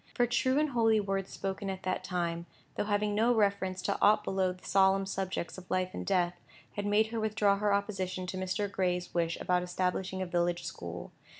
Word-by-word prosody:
For 245 - +4
true 255 +2 +1
and 305 0 +2
holy 225 -3 +4
words 195 -1 -2
spoken 195 +1 -4
at 190 -1 -5
that 185 0 -1
time, 170 -2 -2 0.3
though - - -1
having 205 0 +1
no 230 +4 +3
reference 200 -3 +1
to 200 - -1
aught 210 +1 +5
below 190 -1 +1
the 180 0 -12
solemn 195 0 +4
subjects 190 -2 -3
of 180 - -16
life 185 0 0
and - - -4
death, 175 -2 0 0.3
had 205 0 -3
made 215 +2 +3
her 230 - -1
withdraw 215 -2 +2
her 210 0 +2
opposition 190 -2 -1
to 185 +1 -4
Mr. 185 +2 -1
Gray's 180 -2 -1
wish 170 -1 0
about 180 0 +1
establishing 185 +1 -2
a 185 - -1
village 175 -1 0
school. 85 0 -6
190 Hz, 200 wpm, -31 LUFS, 180-205 Hz, 0.3 s, aught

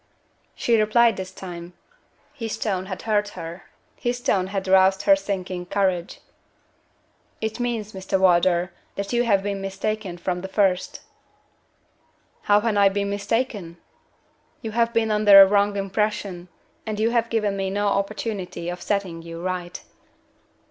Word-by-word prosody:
She 230 -2 +2
replied 225 +1 +4
this 185 -1 -6
time. 175 -2 -9 0.6
His 225 -2 -5
tone 190 -4 -2
had 185 -2 -6
hurt 210 -2 +1
her 170 +3 -8 0.3
his 245 0 -2
tone 190 -6 +1
had 195 -1 -4
roused 190 0 +4
her 295 - +6
sinking 185 -8 -4
courage. 185 -3 -1 1.2
"It 220 +2 -3
means, 230 -3 -2
Mr. 190 0 -2
Wardour, 180 0 +3 0.2
that 200 +3 -4
you 240 - +3
have 200 -4 +2
been 200 -1 -3
mistaken 195 -1 -3
from 180 0 -3
the 190 - -5
first." 190 -2 0 1.5
"How 205 0 +6
have 225 -2 0
I 200 -1 +6
been 200 0 -2
mistaken?" 205 -4 -2 0.9
"You 220 - -4
have 230 +1 +1
been 225 -2 +1
under 210 -2 +7
a 195 - +11
wrong 200 +1 +2
impression, 195 -2 -2 0.4
and 215 -1 -4
you 225 +2 +2
have 235 -1 +1
given 210 -3 0
me 195 -1 -2
no 205 +2 -1
opportunity 200 -3 -3
of 175 0 -6
setting 190 -5 -2
you 165 0 -8
right." 180 -1 -4
200 Hz, 150 wpm, -23 LUFS, 185-215 Hz, 1.5 s, a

